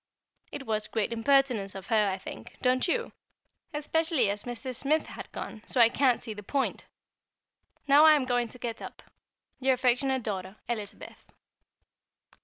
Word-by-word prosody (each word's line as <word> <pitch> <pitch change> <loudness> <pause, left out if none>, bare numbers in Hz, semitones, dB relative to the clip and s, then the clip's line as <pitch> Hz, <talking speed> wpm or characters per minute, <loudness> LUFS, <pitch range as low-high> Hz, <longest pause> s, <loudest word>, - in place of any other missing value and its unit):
It 270 - -7
was 215 -2 -1
great 225 +1 -1
impertinence 235 -5 +2
of 190 -2 -7
her, 210 -2 +2
I 190 - -2
think 190 - -10
don't 255 +3 +2
you? 470 +6 -1 0.6
especially 300 -6 +1
as 205 0 -3
Mrs. 245 +1 -3
Smith 300 +2 +1
had - - -9
gone, 215 - -7
so 255 - 0
I 230 -1 +8
can't 255 -1 +2
see 225 -3 -5
the 205 - -9
point. 270 +7 -2 1.0
Now 285 +2 +7
I 310 - +8
am 280 -3 0
going 245 -1 +1
to 240 - -11
get 235 -2 -5
up. - - -9 0.6
Your 265 0 +3
affectionate 255 +1 +1
daughter, 190 -2 -4
Elizabeth. 215 -4 -6
245 Hz, 160 wpm, -28 LUFS, 215-275 Hz, 1.0 s, I